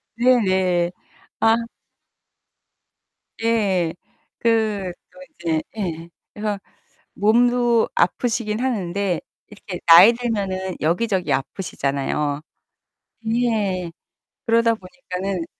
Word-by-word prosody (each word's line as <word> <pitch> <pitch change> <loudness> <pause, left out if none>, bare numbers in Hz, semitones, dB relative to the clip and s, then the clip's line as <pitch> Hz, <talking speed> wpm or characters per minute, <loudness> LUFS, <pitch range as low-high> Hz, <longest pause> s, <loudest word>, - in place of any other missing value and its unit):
네네. 190 -8 +2 0.5
아. 225 0 +5 1.8
예 200 -7 +1 0.5
그 215 -5 +1 0.2
또 - - -17 0.2
이제 160 -2 0 0.2
예 170 -4 -4 0.2
그래서 210 -1 -3 0.6
몸도 240 +2 +3
아프시긴 225 -2 0
하는데 200 -7 -1 0.3
이렇게 200 -3 -8
나이 170 +7 +9
들면은 195 -6 -3
여기저기 175 0 0
아프시잖아요. 140 0 -2 1.0
예 195 -7 0 0.6
그러다 230 0 +3
보니까는 185 -3 -5
200 Hz, 180 characters per minute, -22 LUFS, 175-230 Hz, 1.8 s, 나이